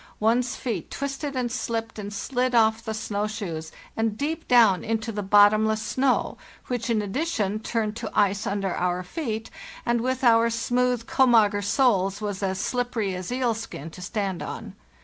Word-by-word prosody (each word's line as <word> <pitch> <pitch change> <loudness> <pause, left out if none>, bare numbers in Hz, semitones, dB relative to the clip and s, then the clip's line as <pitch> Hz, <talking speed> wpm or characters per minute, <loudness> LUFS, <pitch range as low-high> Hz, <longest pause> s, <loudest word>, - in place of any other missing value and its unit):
One's 240 +3 +2
feet 240 -4 -4
twisted 280 0 -4
and 245 -2 -1
slipped 225 -1 -3
and 205 0 -5
slid 250 +4 -1
off 220 0 +3
the 220 -1 -3
snow 210 -1 -2
shoes 170 -7 -5 0.2
and 225 -1 -1
deep 320 +5 -3
down 225 -7 +5
into 225 0 -2
the 205 -1 -3
bottomless 210 +2 +5
snow, 260 -1 0 0.3
which, 245 -1 -3
in 220 -2 +1
addition, 215 - -1
turned 220 -1 -2
to 230 -3 -4
ice 205 +1 +2
under 195 -2 -1
our 180 0 -1
feet, 225 - -4 0.3
and 235 -1 +1
with 260 +2 -1
our 230 -1 +5
smooth 245 +1 0
komager 225 -7 +4
soles 200 -4 +2
was 205 -2 -4
as 190 -1 -1
slippery 240 -3 -1
as 180 -1 -5
eelskin 225 - -2
to 180 - -11
stand 195 -2 -3
on. - - -6
220 Hz, 165 wpm, -25 LUFS, 205-245 Hz, 0.3 s, down